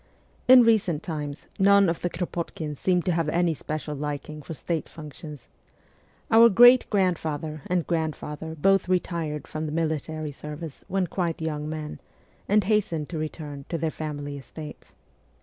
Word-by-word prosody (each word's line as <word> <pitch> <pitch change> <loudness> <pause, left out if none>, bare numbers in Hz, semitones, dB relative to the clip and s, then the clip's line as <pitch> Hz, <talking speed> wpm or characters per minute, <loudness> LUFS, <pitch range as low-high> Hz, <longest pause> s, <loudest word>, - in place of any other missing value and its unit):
In 255 -1 +9
recent 195 -9 +2
times, 150 -4 -5
none 200 0 +6
of 170 0 0
the 175 - -1
Kropotkins 165 -3 -4
seem 180 -2 +2
to 185 - +1
have 165 -2 0
had 155 - -1
any 175 -1 +3
special 155 +1 -5
liking 150 +1 -5
for 160 +3 -7
state 165 +1 -3
functions. 150 -2 -10 0.8
Our 230 +1 +8
great 245 +4 +7
grandfather 160 -6 -1
and 180 -2 0
grandfather 160 -1 -3
both 195 +3 +2
retired 170 -4 -1
from 155 0 -4
the - - -4
military 155 -1 -2
service 150 +1 -8
when 190 0 0
quite 170 -1 -2
young 155 -2 -3
men, 155 -1 -5 0.5
and 210 +1 +4
hastened 185 -7 0
to 165 - -4
return 150 -3 -6
to 165 - -1
their 160 0 -1
family 145 -2 -5
estates. 150 +2 -11
160 Hz, 155 wpm, -26 LUFS, 150-180 Hz, 0.8 s, In